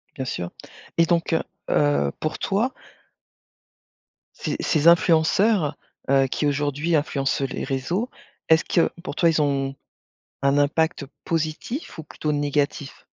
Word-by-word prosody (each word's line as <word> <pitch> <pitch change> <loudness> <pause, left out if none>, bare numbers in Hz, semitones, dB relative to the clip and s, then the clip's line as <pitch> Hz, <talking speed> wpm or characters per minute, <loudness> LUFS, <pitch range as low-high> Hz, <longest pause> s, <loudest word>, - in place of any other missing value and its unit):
Bien 130 - -3
sûr, 85 -8 -4 0.5
et 165 - +5
donc, 170 -1 +1
heu 165 - +2 0.3
heu, 145 - +2
pour 155 - -3
toi 220 +7 0 1.6
ces - - -3
ces 155 0 +1
influenceurs, 170 0 +4 0.3
heu, 135 -1 +4
qui 150 - -1
aujourd'hui 145 +3 0
influencent 140 -2 0
les - - -4
réseaux, 160 - -2 0.4
est-ce 160 0 +5
que 170 - +2
pour - - -5
toi, 170 - +4
ils 160 -2 +2
ont 135 -1 0 0.7
un 140 +1 +3
impact 150 +1 +1 0.2
positif 165 - -3
ou - - -10
plutôt 150 0 -3
négatif? 145 -1 -2
150 Hz, 130 wpm, -23 LUFS, 140-170 Hz, 1.6 s, et